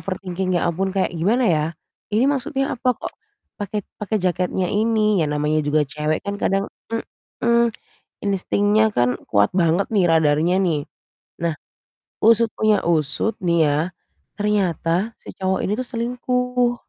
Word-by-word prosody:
overthinking 185 Hz, -1 st, -3 dB
ya -, -, 0 dB
ampun 190 Hz, +3 st, -1 dB
kayak 195 Hz, -, +1 dB
gimana, 215 Hz, +10 st, +2 dB
ya, 155 Hz, -2 st, +2 dB, 0.5 s
ini 225 Hz, +4 st, +4 dB
maksudnya 275 Hz, 0 st, -1 dB
apa, 250 Hz, 0 st, +2 dB
kok -, -, -6 dB, 0.5 s
pakai 205 Hz, +1 st, -3 dB, 0.2 s
pakai 215 Hz, 0 st, -1 dB
jaketnya 180 Hz, 0 st, 0 dB
ini, 215 Hz, -1 st, +2 dB
ya, -, -, +1 dB
namanya 150 Hz, +1 st, +1 dB
juga 150 Hz, +1 st, +3 dB
cewek 150 Hz, +3 st, -2 dB
kan 200 Hz, 0 st, -2 dB
kadang 195 Hz, 0 st, +1 dB, 0.7 s
mhm, 235 Hz, 0 st, +2 dB, 0.5 s
instingnya 205 Hz, +2 st, +2 dB
kan 125 Hz, +1 st, +2 dB
kuat 100 Hz, 0 st, +3 dB
banget 175 Hz, +1 st, +2 dB
nih 195 Hz, -5 st, +3 dB
radarnya 160 Hz, +2 st, +3 dB
nih. 155 Hz, -6 st, 0 dB, 0.6 s
Nah, 170 Hz, -1 st, 0 dB, 0.7 s
usut 230 Hz, +1 st, +5 dB
punya 215 Hz, -2 st, +2 dB
usut 165 Hz, +6 st, +1 dB
nih 170 Hz, -2 st, +2 dB
ya, 145 Hz, -, +2 dB, 0.6 s
ternyata 200 Hz, 0 st, 0 dB
si -, -, -10 dB
cowok 190 Hz, 0 st, 0 dB
ini 195 Hz, -, -1 dB
tuh 255 Hz, -, -3 dB
selingkuh. 250 Hz, +1 st, 0 dB
195 Hz, 140 wpm, -21 LUFS, 165-220 Hz, 0.7 s, usut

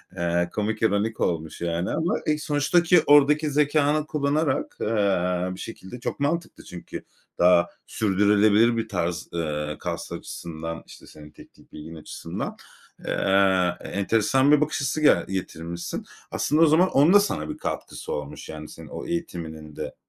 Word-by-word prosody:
eee, 85 Hz, -1 st, 0 dB
komik, 105 Hz, +1 st, -2 dB
ironik 110 Hz, 0 st, +1 dB
olmuş 80 Hz, -2 st, -2 dB
yani 85 Hz, +1 st, -1 dB
ama, 160 Hz, +3 st, 0 dB
e, 155 Hz, 0 st, +1 dB
sonuçtaki 160 Hz, +4 st, +3 dB
oradaki 145 Hz, +1 st, +5 dB
zekânı 150 Hz, +1 st, +2 dB
kullanarak, 150 Hz, +1 st, 0 dB
eee, 95 Hz, -4 st, +1 dB
bir -, -, -12 dB
şekilde 115 Hz, +1 st, -8 dB
çok 120 Hz, -, -4 dB
mantıklı 165 Hz, +4 st, -2 dB
çünkü 90 Hz, -, -9 dB, 0.4 s
daha 90 Hz, -1 st, +5 dB, 0.2 s
sürdürülebilir 105 Hz, +3 st, +3 dB
bir 115 Hz, -, -2 dB
tarz, 90 Hz, -2 st, -3 dB
eee, 75 Hz, -2 st, -2 dB
kas -, -, -5 dB
açısından, 80 Hz, 0 st, -6 dB
işte, -, -, -14 dB
senin 75 Hz, -1 st, -13 dB
teknik -, -, -18 dB
bilgin 80 Hz, +2 st, -9 dB
açısından. 80 Hz, -, -6 dB, 0.5 s
Eee, 95 Hz, -2 st, +2 dB
enteresan 115 Hz, +7 st, +2 dB
bir 150 Hz, 0 st, +5 dB
bakış 150 Hz, 0 st, 0 dB
açısı 140 Hz, +3 st, -1 dB
g 150 Hz, -, +5 dB
getirmişsin. 85 Hz, -2 st, -5 dB, 0.3 s
Aslında 155 Hz, +2 st, +1 dB
o -, -, +8 dB
zaman 165 Hz, +5 st, +4 dB
onun 145 Hz, +7 st, +5 dB
da 205 Hz, -, +9 dB
sana 200 Hz, -, -2 dB
bir -, -, -5 dB
katkısı 455 Hz, -, -5 dB
olmuş 485 Hz, -, -6 dB
yani -, -, -8 dB
senin -, -, -11 dB
o -, -, -7 dB
eğitiminin 80 Hz, -, -5 dB
de -, -, -6 dB
105 Hz, 150 wpm, -25 LUFS, -, 0.5 s, da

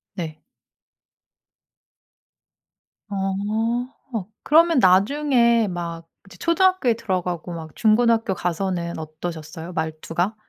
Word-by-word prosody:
네. 160 Hz, -4 st, -6 dB, 2.7 s
어. 210 Hz, +5 st, -1 dB, 0.6 s
그러면 330 Hz, 0 st, +5 dB
나중에 235 Hz, +3 st, +4 dB
막 170 Hz, -2 st, -5 dB, 0.2 s
이제 175 Hz, -2 st, -14 dB
초등학교에 335 Hz, -, +3 dB
들어가고 180 Hz, -6 st, -3 dB
막 160 Hz, -2 st, -8 dB
중고등학교 225 Hz, -1 st, +3 dB
가서는 175 Hz, -1 st, -2 dB
어떠셨어요 160 Hz, +1 st, -7 dB
말투가? 165 Hz, +5 st, -2 dB
190 Hz, 210 characters per minute, -23 LUFS, 170-235 Hz, 2.7 s, 그러면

